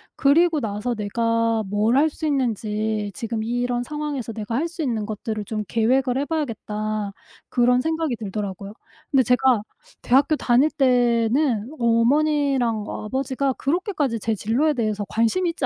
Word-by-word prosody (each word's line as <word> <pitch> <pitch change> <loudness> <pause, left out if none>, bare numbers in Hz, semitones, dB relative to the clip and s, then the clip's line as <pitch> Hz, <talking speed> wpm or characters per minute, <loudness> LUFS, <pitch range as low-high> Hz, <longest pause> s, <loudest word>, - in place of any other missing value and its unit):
그리고 320 +3 +4
나서 220 +1 -2
내가 230 +1 0
뭘 210 +5 +2
할 310 +3 +4
수 315 - -6
있는지 220 -6 -1
지금 225 0 -3
이런 245 +1 -1
상황에서 290 -4 -4
내가 220 +1 -4
할 320 +6 0
수 335 -1 -7
있는 230 -7 -1
것들을 215 0 -4
좀 215 +1 -3
계획을 250 +3 +1
해봐야겠다.' 215 -8 -3 0.4
그런 250 0 +3
생각이 320 -4 -1
들더라고요. 200 -1 -5 0.4
근데 270 -2 +4
제가 250 -2 +3 0.4
대학교 275 +5 +3
다닐 265 +2 +3
때는 245 -2 +2
어머니랑 245 0 +2
아버지가 265 +3 -2
그렇게까지 295 - -1
제 225 +2 -1
진로에 245 +10 +1
대해서 215 -5 -1
관심이 230 +11 +1
있지 325 -5 -3
240 Hz, 325 characters per minute, -23 LUFS, 220-280 Hz, 0.4 s, 그리고